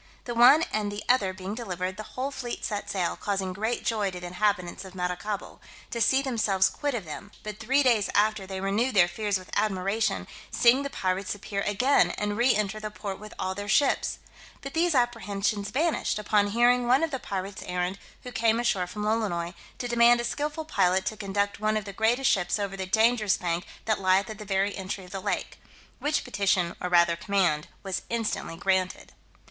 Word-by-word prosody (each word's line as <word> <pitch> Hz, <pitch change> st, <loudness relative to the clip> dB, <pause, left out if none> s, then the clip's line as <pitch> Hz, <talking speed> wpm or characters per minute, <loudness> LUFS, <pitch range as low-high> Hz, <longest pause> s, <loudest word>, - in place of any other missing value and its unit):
The 240 Hz, -, -3 dB
one 245 Hz, +7 st, +7 dB
and 210 Hz, -1 st, 0 dB
the 205 Hz, +1 st, -5 dB
other 230 Hz, -7 st, +3 dB
being 190 Hz, +1 st, -6 dB
delivered, 185 Hz, -5 st, -4 dB
the 215 Hz, -, -6 dB, 0.2 s
whole 265 Hz, +2 st, -1 dB
fleet 250 Hz, -3 st, -5 dB
set 205 Hz, -2 st, -3 dB
sail, 180 Hz, -3 st, -1 dB
causing 195 Hz, -2 st, -2 dB
great 220 Hz, +5 st, -2 dB
joy 210 Hz, -3 st, +1 dB
to 180 Hz, -1 st, -7 dB
the 180 Hz, -, -8 dB
inhabitants 180 Hz, 0 st, -1 dB
of 190 Hz, -1 st, -11 dB
Maracaibo, 180 Hz, +3 st, -4 dB, 0.3 s
to 235 Hz, -, -2 dB
see 265 Hz, +5 st, +4 dB
themselves 205 Hz, -7 st, +2 dB
quit 290 Hz, -3 st, -2 dB
of 210 Hz, -6 st, -4 dB
them: 180 Hz, +6 st, -8 dB
but 210 Hz, -1 st, -6 dB
three 270 Hz, +6 st, +2 dB
days 230 Hz, -6 st, +3 dB
after 210 Hz, -2 st, +2 dB
they 190 Hz, -1 st, -5 dB
renewed 210 Hz, +6 st, 0 dB
their 175 Hz, -3 st, +6 dB
fears 205 Hz, +2 st, -1 dB
with 185 Hz, -1 st, -13 dB
admiration, 205 Hz, +2 st, 0 dB, 0.2 s
seeing 245 Hz, +3 st, +4 dB
the 280 Hz, -, -3 dB
pirates 190 Hz, -4 st, -2 dB
appear 200 Hz, 0 st, -4 dB
again, 245 Hz, +8 st, +3 dB
and 205 Hz, 0 st, -1 dB
re 240 Hz, +3 st, +3 dB
enter 210 Hz, 0 st, -1 dB
the 215 Hz, 0 st, -4 dB
port 205 Hz, -2 st, -6 dB
with 210 Hz, +1 st, -10 dB
all 185 Hz, -, -2 dB
their 205 Hz, +1 st, -6 dB
ships: 270 Hz, +7 st, +2 dB, 0.4 s
but 275 Hz, 0 st, -7 dB
these 335 Hz, -1 st, +2 dB
apprehensions 210 Hz, -4 st, 0 dB
vanished, 310 Hz, -3 st, 0 dB
upon 210 Hz, -1 st, +2 dB
hearing 240 Hz, +3 st, +3 dB
one 260 Hz, +6 st, +4 dB
of 325 Hz, -, 0 dB
the 265 Hz, -, -2 dB
pirate's 195 Hz, -2 st, -5 dB
errand, 180 Hz, +1 st, -2 dB, 0.2 s
who 250 Hz, -, -7 dB
came 230 Hz, -1 st, +2 dB
ashore 200 Hz, -7 st, +1 dB
from 210 Hz, +3 st, -5 dB
Lolonois, 205 Hz, -6 st, -1 dB, 0.2 s
"to 245 Hz, -, -3 dB
demand 240 Hz, 0 st, +5 dB
a -, -, -1 dB
skilful 295 Hz, +6 st, -3 dB
pilot 190 Hz, -, +2 dB
to 215 Hz, -, -2 dB
conduct 200 Hz, -1 st, -2 dB
one 215 Hz, 0 st, +1 dB
of 210 Hz, -, -4 dB
the 200 Hz, -, -7 dB
greatest 235 Hz, +6 st, +2 dB
ships 180 Hz, 0 st, +1 dB
over 200 Hz, -2 st, -3 dB
the 190 Hz, -1 st, -4 dB
dangerous 220 Hz, 0 st, +3 dB
bank 175 Hz, 0 st, -2 dB, 0.2 s
that 220 Hz, -2 st, 0 dB
lieth 190 Hz, +1 st, +3 dB
at 215 Hz, -, -9 dB
the 210 Hz, -, -7 dB
very 195 Hz, 0 st, 0 dB
entry 190 Hz, 0 st, -5 dB
of 180 Hz, -, -14 dB
the 195 Hz, -, -5 dB
lake." -, -, -3 dB, 0.4 s
Which 300 Hz, +1 st, 0 dB
petition, 195 Hz, -7 st, +1 dB
or 180 Hz, -, -2 dB
rather 170 Hz, -1 st, +4 dB
command, 170 Hz, -5 st, +1 dB, 0.2 s
was 195 Hz, -1 st, -2 dB
instantly 225 Hz, -7 st, -2 dB
granted. 185 Hz, 0 st, -1 dB
205 Hz, 200 wpm, -27 LUFS, 190-235 Hz, 0.4 s, one